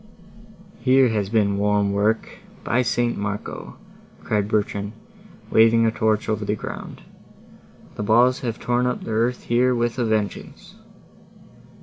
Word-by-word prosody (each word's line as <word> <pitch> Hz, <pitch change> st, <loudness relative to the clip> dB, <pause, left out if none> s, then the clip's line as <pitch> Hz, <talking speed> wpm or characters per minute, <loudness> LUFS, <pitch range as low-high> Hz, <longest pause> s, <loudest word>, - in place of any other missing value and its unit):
"Here 130 Hz, -1 st, +4 dB
has 105 Hz, -3 st, -1 dB
been 100 Hz, -3 st, +1 dB
warm 105 Hz, -1 st, +1 dB
work, 105 Hz, +3 st, -1 dB, 0.2 s
by 120 Hz, -, +1 dB
St. 120 Hz, -1 st, 0 dB
Marco!" 100 Hz, +1 st, -5 dB, 0.5 s
cried 105 Hz, -2 st, 0 dB
Bertrand, 105 Hz, -1 st, -1 dB, 0.6 s
waving 115 Hz, +1 st, +5 dB
a 110 Hz, -, +2 dB
torch 110 Hz, -1 st, 0 dB
over 110 Hz, -1 st, -1 dB
the 105 Hz, +1 st, -1 dB
ground; -, -, -8 dB, 0.9 s
"the -, -, -3 dB
balls 120 Hz, +5 st, +3 dB
have 120 Hz, -4 st, -4 dB
torn 120 Hz, 0 st, 0 dB
up 125 Hz, -, -3 dB
the -, -, -6 dB
earth 115 Hz, +3 st, 0 dB
here 125 Hz, +2 st, +2 dB
with 120 Hz, +1 st, -1 dB
a 120 Hz, -, +1 dB
vengeance." 110 Hz, -3 st, -3 dB
110 Hz, 135 wpm, -22 LUFS, 105-120 Hz, 0.9 s, waving